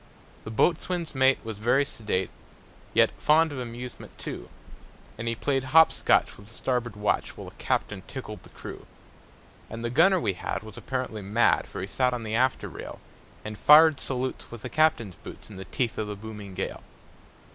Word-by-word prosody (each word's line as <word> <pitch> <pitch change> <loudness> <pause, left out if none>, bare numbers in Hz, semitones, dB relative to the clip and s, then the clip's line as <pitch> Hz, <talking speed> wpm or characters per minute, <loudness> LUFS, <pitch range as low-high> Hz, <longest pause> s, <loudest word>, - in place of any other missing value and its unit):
The - - -5
boatswain's 170 - 0
mate 130 0 +4
was 110 -3 -6
very 130 +6 +3
sedate, 105 -8 -2 0.6
Yet - - +4
fond 160 +1 +4
of 140 - -5
amusement, 120 0 -8
too; - - -7 0.7
And 115 +1 -6
he 115 - 0
played 135 +2 0
hop 160 +4 +6
scotch - - +2
with 100 - -14
the 110 - -15
starboard 120 -4 -1
watch, 105 0 -1
While - - -8
the - - -23
captain 105 -3 -1
tickled 105 -7 -7
the - - -16
crew. - - -10 0.8
And 115 +1 -6
the 120 - -1
gunner 180 +8 +5
we 105 - 0
had 95 +3 -4
was 110 -1 -10
apparently 130 -5 -4
mad, 105 +4 +2
For - - -6
he - - -2
sat 125 +4 +1
on 120 - -5
the 110 0 -4
after 130 +2 +1
rail, - - -8 0.5
And 105 0 -6
fired 155 -1 +7
salutes 130 0 -3
with 115 -2 -10
the - - -4
captain's 135 - +2
boots, - - -11
In 100 - -10
the 95 - -7
teeth 120 +4 -2
of 110 - -2
the 105 - -4
booming 105 -2 -9
gale. 95 - -4
120 Hz, 190 wpm, -27 LUFS, 105-135 Hz, 0.8 s, fired